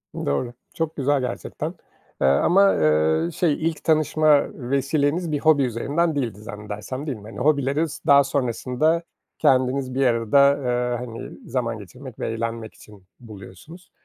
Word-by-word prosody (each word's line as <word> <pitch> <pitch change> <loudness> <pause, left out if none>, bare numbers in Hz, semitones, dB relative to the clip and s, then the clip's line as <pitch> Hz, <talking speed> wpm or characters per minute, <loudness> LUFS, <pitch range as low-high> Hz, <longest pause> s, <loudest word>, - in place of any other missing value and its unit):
Doğru, 120 - -2 0.2
çok 160 -1 -3
güzel 140 0 +1
gerçekten. 125 -1 -4 0.5
Eee, 65 - +4
ama, 180 - +4
ııı, 80 - +2
şey 165 -4 +1 0.2
ilk 160 - -9
tanışma 155 -2 +3
vesileniz 145 +5 -1
bir 145 - 0
hobi 155 -2 +4
üzerinden 145 +7 -1
değildi 115 -8 -3
zannedersem, 105 +6 -7
değil 135 -5 -3
mi? 105 - -14
Hani, 110 - -9
hobileriniz, 145 +2 0
daha 140 0 +7
sonrasında 135 +4 0 0.4
kendiniz 130 -2 +2
bir 135 0 +2
arada, 130 +4 +4
eee, 125 -2 -1
hani, 115 -1 -8 0.2
zaman 115 -2 -2
geçirmek 120 +6 -12
ve - - -2
eğlenmek 115 -1 -4
için 105 -3 -17 0.2
buluyorsunuz. 110 - -13
130 Hz, 140 wpm, -23 LUFS, 115-145 Hz, 0.5 s, daha